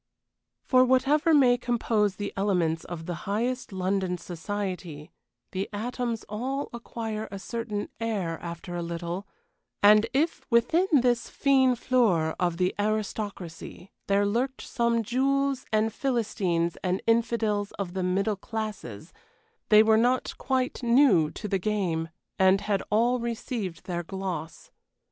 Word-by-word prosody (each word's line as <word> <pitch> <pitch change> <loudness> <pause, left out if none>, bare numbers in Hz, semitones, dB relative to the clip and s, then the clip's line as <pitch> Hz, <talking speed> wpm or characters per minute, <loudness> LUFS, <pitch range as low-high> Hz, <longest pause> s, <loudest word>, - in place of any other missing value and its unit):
For 255 -1 +5
whatever 275 +6 +3
may 255 -5 +5
compose 225 -4 +1
the 205 -1 -5
elements 180 -5 0
of 165 -2 -7
the 175 - -3 0.2
highest 240 +5 -1
London 185 -1 -1
society, 180 -3 -5 0.4
the 195 +1 -3
atoms 235 +2 -3
all 260 +7 -3
acquire 225 -2 -5
a 200 - -6
certain 215 0 -4
air 200 -8 -2
after 170 +1 -6
a 175 - -2
little, 170 +3 -4 0.6
and 210 +2 +7
if 300 +6 0
within 295 +10 +3
this 245 -5 +3
fine 265 -2 +3
fleur 220 -11 +2
of 175 -2 0
the 180 0 +1
aristocracy 205 -4 -4 0.2
there 200 0 +3
lurked 245 +6 -1
some 235 -2 0
Jews 275 +3 0
and 215 0 +1
Philistines 190 -10 -1
and 185 0 -1
infidels 225 -3 +1
of 190 -3 -5
the 190 - -2
middle 195 +4 +1
classes, 195 - -6 0.6
they 215 0 +8
were 220 0 +4
not 245 +3 +1
quite 260 -1 -1
new 235 - +4
to 210 - -6
the 195 -1 0
game, 175 -5 -1 0.3
and 190 +1 +5
had 200 -2 0
all 240 +4 +2
received 230 -5 -4
their 175 -2 -2
gloss. 175 -3 -6
210 Hz, 135 wpm, -27 LUFS, 185-240 Hz, 0.6 s, they